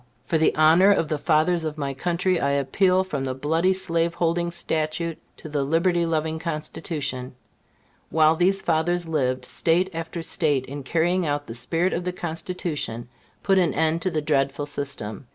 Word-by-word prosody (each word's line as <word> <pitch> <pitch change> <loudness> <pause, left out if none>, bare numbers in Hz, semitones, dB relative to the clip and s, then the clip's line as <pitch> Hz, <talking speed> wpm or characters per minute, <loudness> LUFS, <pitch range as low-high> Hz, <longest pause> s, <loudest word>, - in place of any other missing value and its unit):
for 160 +4 0
the 160 - +3
honor 160 +5 +6
of 165 -6 +1
the 155 - 0
fathers 160 +3 +2
of 155 -1 -4
my 140 -2 -2
country, 175 +4 0
I 140 - +1
appeal 180 +7 +2
from 150 -8 -4
the 130 -1 -3
bloody 160 +7 +1
slaveholding 170 -1 0
statute 160 0 -2 0.2
to - - -10
the 145 -2 -1
liberty 170 +3 +1
loving 160 0 -1
Constitution. 150 -5 -4 0.7
While 155 0 +4
these 190 +3 +2
fathers 170 +1 +1
lived, 130 -5 -1
State 175 +7 +1
after 165 +1 -5
State, 145 -5 0
in 140 +2 -7
carrying 170 +5 +1
out 145 0 -1
the 115 - -7
spirit 165 +10 0
of 175 - -2
the 180 0 -3
Constitution, 160 -8 -4 0.3
put 195 -1 +3
an 170 -6 +1
end 160 +2 +1
to 185 - +1
the 155 -4 -2
dreadful 140 -1 0
system. 135 -6 -4
160 Hz, 170 wpm, -24 LUFS, 145-175 Hz, 0.7 s, honor